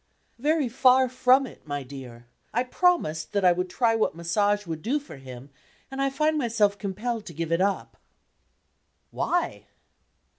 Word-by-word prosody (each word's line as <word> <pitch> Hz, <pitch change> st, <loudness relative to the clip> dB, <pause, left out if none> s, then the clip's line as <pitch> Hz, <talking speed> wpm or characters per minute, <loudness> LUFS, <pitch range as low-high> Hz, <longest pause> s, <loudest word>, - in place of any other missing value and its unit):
"Very 300 Hz, +1 st, +1 dB
far 255 Hz, +2 st, +4 dB
from 255 Hz, +2 st, +4 dB
it, 245 Hz, -, -13 dB
my 145 Hz, -1 st, -3 dB
dear. 125 Hz, -3 st, -10 dB, 0.3 s
I 245 Hz, -, +3 dB
promised 250 Hz, -, +1 dB
that 200 Hz, -2 st, +1 dB
I 180 Hz, -, +7 dB
would 180 Hz, +1 st, -1 dB
try 230 Hz, +4 st, +2 dB
what 220 Hz, -8 st, 0 dB
Massage 205 Hz, +5 st, 0 dB
would 160 Hz, -2 st, -5 dB
do 275 Hz, -, 0 dB
for 285 Hz, -, -12 dB
him, 130 Hz, +1 st, -11 dB, 0.4 s
and 270 Hz, 0 st, -3 dB
I 275 Hz, -, +2 dB
find 305 Hz, +3 st, +1 dB
myself 225 Hz, -5 st, +2 dB
compelled 210 Hz, +3 st, -3 dB
to 170 Hz, -, -9 dB
give 165 Hz, +1 st, -3 dB
it 165 Hz, +2 st, +2 dB
up." 200 Hz, 0 st, -1 dB, 1.2 s
"Why?" 355 Hz, 0 st, -1 dB
205 Hz, 160 wpm, -26 LUFS, 165-255 Hz, 1.2 s, I